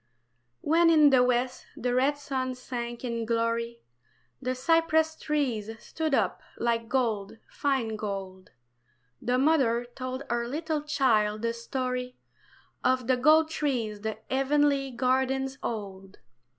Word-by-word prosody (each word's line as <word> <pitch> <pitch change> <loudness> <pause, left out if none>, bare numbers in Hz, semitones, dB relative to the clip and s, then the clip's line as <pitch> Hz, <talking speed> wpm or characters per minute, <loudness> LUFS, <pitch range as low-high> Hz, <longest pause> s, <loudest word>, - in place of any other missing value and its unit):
WHEN 330 +2 +4
in 305 -3 +6
the 260 -2 +6
west 250 +1 0
the 245 -1 -1
red 270 +3 +2
sun 260 -3 -3
sank 240 -1 -6
in 235 -2 -2
glory, 230 +1 -1 0.6
The 255 0 -1
cypress 320 +3 +2
trees 265 -10 -1
stood 310 +5 -2
up - - 0 0.2
like 230 -1 -1
gold, 225 -6 -1
fine 260 -6 -1
gold; 195 -3 -6 0.7
The 250 +1 +1
mother 260 -5 +3
told 255 +2 -6
her 235 0 0
little 310 +3 -2
child 220 -8 +1
the 230 0 0
story 250 +1 -3 0.7
Of 255 -1 +2
the 255 +1 +3
gold 310 +5 +4
trees 235 -10 -2
the 220 0 -3
heavenly 275 +1 +2
gardens 265 +2 0
hold. 195 -3 -6
255 Hz, 125 wpm, -28 LUFS, 230-275 Hz, 0.7 s, in